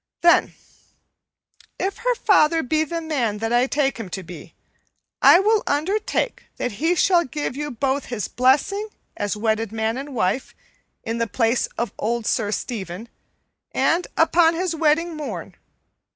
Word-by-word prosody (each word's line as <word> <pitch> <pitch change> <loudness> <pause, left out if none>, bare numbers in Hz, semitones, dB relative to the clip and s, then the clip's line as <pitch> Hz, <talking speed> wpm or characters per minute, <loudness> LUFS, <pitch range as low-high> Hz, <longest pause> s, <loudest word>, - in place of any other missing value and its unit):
"Then, 340 0 +4 1.2
if 390 +1 -2
her - - 0
father 330 -8 +3
be 310 +5 +1
the 335 +2 -4
man 260 -10 -1
that 225 +2 -2
I 245 +2 +3
take 275 -2 0
him 215 -5 -6
to 190 +1 -5
be, 175 0 -11 0.7
I 345 - +8
will 425 +2 +3
undertake 395 +10 -1
that 250 - -2
he 320 - 0
shall 345 +1 +4
give 290 -2 -4
you 295 +1 -3
both 270 +2 -1
his 235 -5 -4
blessing 290 - +1 0.3
as 205 0 -2
wedded 220 0 0
man 225 +2 -1
and 275 -1 -7
wife, 225 +4 -1 0.5
in 230 0 -3
the 230 - 0
place 230 +2 +1
of 235 -3 -2
old 235 +1 -1
Sir 210 -2 0
Stephen, 210 -2 -5 0.6
and 345 +2 +1
upon 330 0 +4
his 350 -1 -1
wedding 325 +2 +1
morn. 305 -1 -6
275 Hz, 150 wpm, -22 LUFS, 225-335 Hz, 1.2 s, I